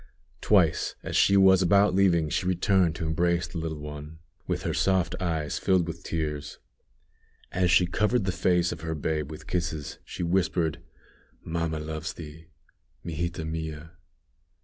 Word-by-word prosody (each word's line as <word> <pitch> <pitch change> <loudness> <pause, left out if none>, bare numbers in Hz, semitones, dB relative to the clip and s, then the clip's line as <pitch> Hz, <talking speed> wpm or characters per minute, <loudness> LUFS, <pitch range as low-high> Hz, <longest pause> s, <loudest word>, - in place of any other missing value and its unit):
Twice, - - +3
as - - -4
she 100 - +5
was 95 -1 +6
about 100 +2 +4
leaving, 90 -4 +3
she 90 - -1
returned 90 -2 +2
to 85 - -4
embrace 85 +2 +1
the 85 - -6
little 80 -1 -4
one, 75 +1 -8 0.3
with - - -2
her - - -1
soft 95 -3 +1
eyes 80 -6 -1
filled 95 -3 +2
with 85 0 -6
tears. 75 -3 -4 0.9
As 90 0 +1
she 85 +1 +5
covered 105 +6 +1
the 95 - +1
face 90 0 +2
of 85 - -6
her 80 0 -3
babe 75 -1 -2
with 75 - -9
kisses, 80 -4 -3
she - - -6
whispered, 85 -2 0 0.6
"Mamma 80 -1 -2
loves 80 +1 -5
thee. 80 0 -11 0.6
_Mijita 85 0 -3
mia. 80 0 -5
85 Hz, 150 wpm, -27 LUFS, 80-90 Hz, 0.9 s, was